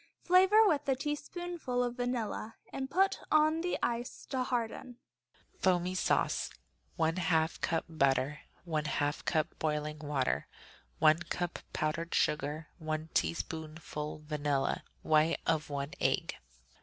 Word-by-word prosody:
Flavor 380 Hz, +5 st, +6 dB
with 290 Hz, -6 st, +1 dB
a 265 Hz, -, +4 dB
teaspoonful 295 Hz, -1 st, -2 dB
of 245 Hz, -1 st, -1 dB
vanilla 240 Hz, -2 st, -2 dB, 0.2 s
and 265 Hz, 0 st, -3 dB
put 385 Hz, +5 st, +3 dB
on 310 Hz, +1 st, +4 dB
the 355 Hz, +1 st, 0 dB
ice 240 Hz, +1 st, -2 dB
to 260 Hz, -2 st, 0 dB
harden. 245 Hz, 0 st, -2 dB, 0.6 s
Foamy 180 Hz, -1 st, +2 dB
Sauce 185 Hz, -, +1 dB, 0.5 s
1/2 165 Hz, -1 st, +1 dB
cup 165 Hz, -1 st, 0 dB
butter. 140 Hz, -2 st, +1 dB, 0.3 s
1/2 150 Hz, -2 st, 0 dB
cup 155 Hz, -3 st, +1 dB
boiling 150 Hz, -1 st, -1 dB
water. 140 Hz, -, 0 dB, 0.5 s
1 155 Hz, -, +5 dB
cup 175 Hz, -1 st, -2 dB
powdered 165 Hz, +2 st, -1 dB
sugar. 150 Hz, +2 st, +1 dB
1 155 Hz, 0 st, -3 dB
teaspoonful 155 Hz, -2 st, -3 dB
vanilla. 145 Hz, -2 st, 0 dB, 0.2 s
White 155 Hz, +1 st, +3 dB
of 160 Hz, -1 st, +1 dB
one 140 Hz, 0 st, -3 dB
egg. -, -, +1 dB
165 Hz, 120 wpm, -32 LUFS, 155-250 Hz, 0.6 s, Flavor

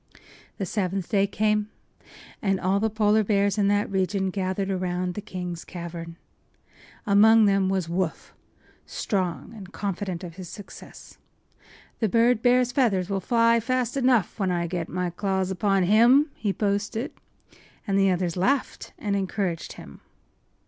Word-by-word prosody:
The 195 Hz, -, -2 dB
seventh 190 Hz, -1 st, -2 dB
day 200 Hz, -2 st, +2 dB
came, 210 Hz, +1 st, 0 dB, 0.7 s
and 195 Hz, -2 st, +1 dB
all 190 Hz, +2 st, +1 dB
the 220 Hz, +2 st, +1 dB
Polar 215 Hz, 0 st, +2 dB
bears 200 Hz, 0 st, +1 dB
in 200 Hz, -, +3 dB
that 205 Hz, +1 st, +2 dB
region 190 Hz, 0 st, 0 dB
gathered 190 Hz, 0 st, -2 dB
around 180 Hz, -1 st, -2 dB
the 210 Hz, -, -5 dB
king’s 180 Hz, -4 st, -6 dB
cavern. 170 Hz, -1 st, -7 dB, 0.9 s
Among 215 Hz, +2 st, +6 dB
them 195 Hz, -1 st, +2 dB
was 190 Hz, -3 st, -1 dB
Woof, 175 Hz, 0 st, -3 dB, 0.5 s
strong 180 Hz, -, -3 dB
and 195 Hz, -3 st, -10 dB
confident 190 Hz, -3 st, -4 dB
of 170 Hz, -1 st, -9 dB
his 185 Hz, -3 st, -8 dB
success. 205 Hz, -, -12 dB, 0.8 s
“The 220 Hz, -, +1 dB
bird 230 Hz, +2 st, +3 dB
bear’s 250 Hz, 0 st, +3 dB
feathers 205 Hz, -8 st, +1 dB
will 195 Hz, -, 0 dB
fly 230 Hz, +2 st, +3 dB
fast 250 Hz, +1 st, -1 dB
enough 250 Hz, -7 st, +2 dB
when 195 Hz, -2 st, +1 dB
I 175 Hz, -1 st, 0 dB
get 170 Hz, -1 st, -4 dB
my 180 Hz, 0 st, -2 dB
claws 190 Hz, +1 st, -1 dB
upon 195 Hz, 0 st, +1 dB
him!” 240 Hz, -, +5 dB
he 210 Hz, -3 st, -2 dB
boasted; 210 Hz, +5 st, -2 dB, 0.7 s
and 200 Hz, -3 st, -1 dB
the 195 Hz, 0 st, +4 dB
others 180 Hz, -2 st, 0 dB
laughed 255 Hz, +9 st, -1 dB
and 205 Hz, -2 st, -2 dB
encouraged 190 Hz, -3 st, -2 dB
him. -, -, -13 dB
195 Hz, 150 wpm, -25 LUFS, 185-215 Hz, 0.9 s, Among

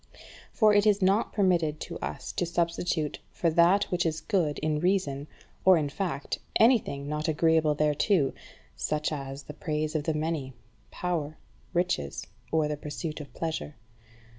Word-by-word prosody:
For 215 Hz, -2 st, +4 dB
it 205 Hz, +1 st, +4 dB
is 205 Hz, -1 st, +4 dB
not 195 Hz, +4 st, +3 dB
permitted 170 Hz, -6 st, +2 dB
to -, -, -6 dB
us -, -, -5 dB
to 175 Hz, -, -1 dB
substitute 170 Hz, -2 st, -1 dB
for 170 Hz, -, 0 dB
that 175 Hz, +5 st, +5 dB
which 180 Hz, -1 st, +1 dB
is 160 Hz, -1 st, -1 dB
good 175 Hz, -9 st, 0 dB
in 155 Hz, 0 st, 0 dB
reason 155 Hz, -6 st, 0 dB, 0.4 s
or 185 Hz, -1 st, +7 dB
in 150 Hz, -3 st, 0 dB
fact 150 Hz, -3 st, -3 dB, 0.2 s
anything 220 Hz, -, +3 dB
not 150 Hz, +1 st, -2 dB
agreeable 160 Hz, -1 st, +3 dB
thereto, 150 Hz, +1 st, +2 dB, 0.4 s
such 150 Hz, 0 st, -1 dB
as 135 Hz, -1 st, -5 dB
the 150 Hz, -, -9 dB
praise 155 Hz, -1 st, -2 dB
of 155 Hz, -2 st, -1 dB
the 160 Hz, -, 0 dB
many, 155 Hz, -4 st, -2 dB, 0.4 s
power, 155 Hz, -4 st, -3 dB, 0.3 s
riches, 175 Hz, -, -1 dB, 0.3 s
or 160 Hz, -1 st, +2 dB
the 150 Hz, 0 st, -3 dB
pursuit 150 Hz, +1 st, -5 dB
of 145 Hz, -, -11 dB
pleasure. 160 Hz, -2 st, -3 dB
160 Hz, 155 wpm, -28 LUFS, 150-180 Hz, 0.4 s, or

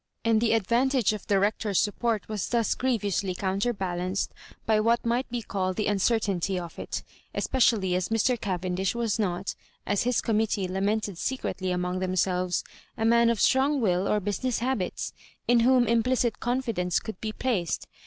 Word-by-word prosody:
And 225 Hz, -1 st, +3 dB
the 230 Hz, -, +3 dB
advantage 235 Hz, +2 st, +2 dB
of 210 Hz, -, -7 dB
the 200 Hz, -1 st, +3 dB
Hec 205 Hz, +2 st, +1 dB
tor's 205 Hz, -4 st, +1 dB
support 220 Hz, 0 st, 0 dB
was 215 Hz, -3 st, -3 dB
thus 235 Hz, -2 st, +2 dB
grievously 205 Hz, -7 st, -1 dB
counterbal 195 Hz, -1 st, -1 dB
anced 185 Hz, +2 st, -1 dB, 0.4 s
by 220 Hz, -1 st, +3 dB
what 230 Hz, +2 st, +2 dB
might 240 Hz, +3 st, 0 dB
be 240 Hz, -1 st, -3 dB
called 185 Hz, -2 st, -2 dB
the 215 Hz, -, -1 dB
uncertainty 200 Hz, -2 st, +1 dB
of 170 Hz, -2 st, -6 dB
it— -, -, -4 dB, 0.3 s
especially 220 Hz, -8 st, +2 dB
as 180 Hz, 0 st, 0 dB
Mr. 225 Hz, +3 st, +2 dB
Cavendish 185 Hz, +1 st, -1 dB
was 230 Hz, -2 st, -1 dB
not, 185 Hz, -2 st, -1 dB, 0.3 s
as 205 Hz, -1 st, +1 dB
his 245 Hz, 0 st, +1 dB
committee 215 Hz, -3 st, 0 dB
lamented 200 Hz, 0 st, -1 dB
secretly 220 Hz, -7 st, -2 dB
among 180 Hz, 0 st, -1 dB
them 185 Hz, 0 st, -1 dB
selves, 180 Hz, -1 st, +1 dB, 0.3 s
a 225 Hz, -, 0 dB
man 235 Hz, +1 st, +5 dB
of 230 Hz, -2 st, 0 dB
strong 275 Hz, +2 st, +3 dB
will 190 Hz, -4 st, +1 dB
or 210 Hz, -, +2 dB
busmess 210 Hz, +5 st, -1 dB
habits, 240 Hz, -6 st, -2 dB, 0.3 s
in 240 Hz, 0 st, +5 dB
whom 250 Hz, +1 st, +5 dB
implicit 235 Hz, 0 st, +1 dB
confidence 230 Hz, -8 st, 0 dB
could 220 Hz, -4 st, -8 dB
be 220 Hz, -, -2 dB
placed. 215 Hz, -8 st, -1 dB
215 Hz, 170 wpm, -27 LUFS, 185-235 Hz, 0.4 s, man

